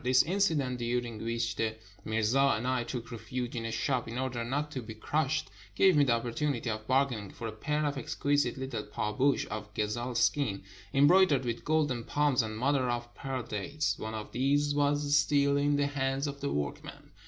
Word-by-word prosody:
This 130 +1 +5
incident, 160 -9 +1
during 120 -2 -2
which 115 -1 -1
the 110 -1 0 0.3
mirza 110 +6 +2
and 115 - -4
I 130 -2 +1
took 120 -1 -6
refuge 120 +2 -4
in 115 -1 -3
a 115 - -2
shop 125 +2 -1
in 115 +2 -5
order 130 -2 -2
not 145 +5 -2
to 130 - -4
be 110 -1 -8
crushed, 150 0 -1 0.2
gave 190 -3 +5
me 145 - +6
the 130 -4 +3
opportunity 120 +1 -1
of 110 0 -5
bargaining 130 -6 +1
for 115 - -8
a - - -4
pair 150 +7 -1
of 145 -1 -1
exquisite 140 0 0
Httle 120 -6 -4
pahboush 110 +7 +1
of 105 0 -5
gazelle 120 +4 -2
skin, 120 -4 +1 0.3
embroidered 145 -1 +5
with 115 -1 -3
golden 150 -6 +1
palms 145 0 +2
and 110 -1 -4
mother 130 +1 +1
of 120 0 -3
pearl 135 -2 -4
dates. 140 +8 -2
One 110 0 -4
of 105 -1 -6
these 145 +3 +2
was 145 0 +2
still 140 -1 +3
in 145 0 +2
the 145 0 +2
hands 135 -1 -1
of 140 -1 -5
the 140 - -1
workmen. 75 -1 -5
130 Hz, 190 wpm, -30 LUFS, 115-145 Hz, 0.3 s, me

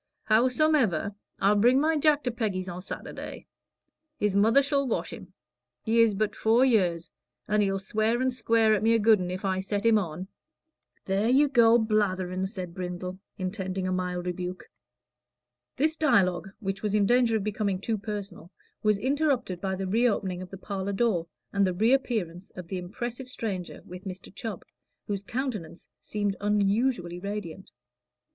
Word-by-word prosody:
Howsomever, 235 - +2 0.3
I'll 205 +1 +4
bring 245 +5 +5
my 315 +2 +2
Jack 300 -1 +3
to 245 - -1
Peggy's 205 -6 -2
o' 175 0 -5
Saturday. 185 - -7 0.7
His 205 -2 0
mother 225 +7 +5
shall 280 -1 0
wash 235 - -2
him. - - -10 0.5
He 230 +1 +3
is 225 -3 +4
but 210 +1 -1
four 230 +4 +4
year 205 -9 +3
old, 170 +1 -10 0.4
and 210 0 +2
he'll 195 -1 +1
swear 215 +4 0
and 260 0 +1
square 230 -3 +3
at 210 - +1
me 225 +1 +4
a - - +3
good 215 -1 +5
un, 180 -1 -3
if 185 +2 -4
I 190 -1 0
set 200 +2 -2
him 225 -2 +5
on." 180 0 -5 0.8
"There 195 +4 +1
you 280 +4 +5
go 235 -4 +5
blatherin'," 190 -4 0
said 185 -4 -6
Brindle, 180 0 -5 0.2
intending 185 0 -3
a - - -1
mild 180 -1 -2
rebuke. 180 0 -5 1.0
This 310 +4 +2
dialogue, 200 - +2
which 195 -3 -3
was 210 -1 0
in 205 -1 +3
danger 240 0 +3
of 205 - -3
becoming 205 -2 -1
too 220 +2 -2
personal, 200 -5 -6 0.3
was 210 -1 +3
interrupted 260 - 0
by 190 -1 -1
the 190 +1 -3
reopening 200 -3 +1
of 185 - -8
the 195 - -8
parlor 195 0 -4
door, 195 -6 +1 0.3
and 200 -1 +3
the 185 - -1
reappearance 215 -5 0
of 180 -2 -8
the 190 - -3
impressive 240 +7 -6
stranger 195 -8 -5
with 180 +2 -10
Mr. 185 -1 -8
Chubb, 205 -2 -6 0.4
whose 200 -2 -3
countenance 215 - -5
seemed 205 -2 -2
unusually 205 -2 +1
radiant. 195 -2 -6
205 Hz, 165 wpm, -27 LUFS, 185-230 Hz, 1.0 s, bring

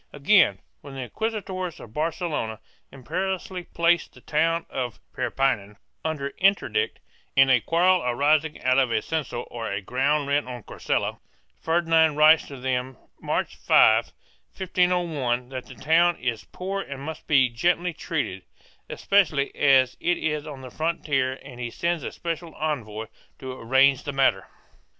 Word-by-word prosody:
Again, 145 - +4 0.2
when 140 -1 -10
the 135 - -5
inquisitors 190 - -4
of 110 - -12
Barcelona 150 - -2 0.3
imperiously 185 +6 -4
placed 170 +1 +1
the - - -15
town 165 +2 0
of 125 -4 -4
Perpinan 105 -7 -1 0.3
under 150 -3 -3
interdict, 200 - +1 0.4
in 135 -1 +6
a 125 -3 +5
quarrel 180 +5 +3
arising 150 +5 +1
out 130 +1 +4
of 130 -2 +2
a 110 -2 0
censal 135 -7 -3
or 115 -4 -3
ground 140 +7 0
rent 145 -1 +1
on 125 -3 -7
Carcella, - - -2 0.4
Ferdinand 160 -2 +3
writes 155 +1 +6
to 140 - -9
them, 130 0 -2 0.2
March - - -2
5, - - +5 0.5
1501, 170 -10 0
that 130 -1 -7
the 130 - -11
town 165 +7 +3
is 120 -6 -3
poor 195 +2 -4
and 140 -5 -7
must 160 +1 -7
be 135 -4 +5
gently 175 +9 0
treated, 140 - -3 0.5
especially 160 -9 +1
as 135 -3 +4
it 175 0 +1
is 150 -1 -2
on 140 -3 -8
the 130 -1 -10
frontier, 145 -5 -1
and 130 -3 -11
he 120 -1 -3
sends 170 +6 -1
a - - -5
special 170 -1 -5
envoy 115 -8 -3 0.3
to 130 - -7
arrange 130 +2 +3
the 145 - -4
matter. 135 -1 +2
145 Hz, 145 wpm, -25 LUFS, 130-170 Hz, 0.5 s, in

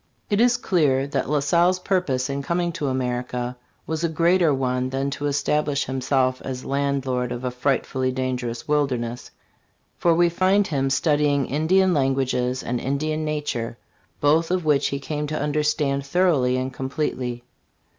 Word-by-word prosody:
It 205 +2 +3
is 240 0 +4
clear 150 - +2
that 140 -2 -2
La 150 -1 +2
Salle's 175 +5 +3
purpose 180 -9 0
in 140 0 -3
com 170 +5 -1
ing 175 -1 0
to 160 -4 -3
America 125 -1 -2 0.3
was 160 +1 -3
a 170 - +2
greater 170 +1 +3
one 130 -1 0
than 135 +1 -2
to 145 +1 -3
establish 145 0 0
himself 130 0 0
as 130 -1 -5
landlord 135 -3 -1
of 120 +1 -5
a 125 - -1
frightfully 130 0 0
dangerous 125 -2 -3
wilderness; 125 -5 -1 0.7
for 170 -1 +3
we 175 +1 +4
find 190 +4 +2
him 135 -5 0
studying 145 0 +2
Indian 180 +7 +2
languages 130 -3 0
and 120 0 -2
In 140 +3 -1
dian 155 +1 -2
nature, 145 -7 -3 0.4
both 155 +3 +3
of 180 -2 0
which 145 -2 +3
he 140 - -3
came 150 +1 -3
to 155 +1 -3
understand 150 -1 0
thoroughly 140 -5 +2
and 130 +1 -3
complete 135 +2 -2
ly. 120 -1 -4
140 Hz, 165 wpm, -23 LUFS, 130-155 Hz, 0.7 s, is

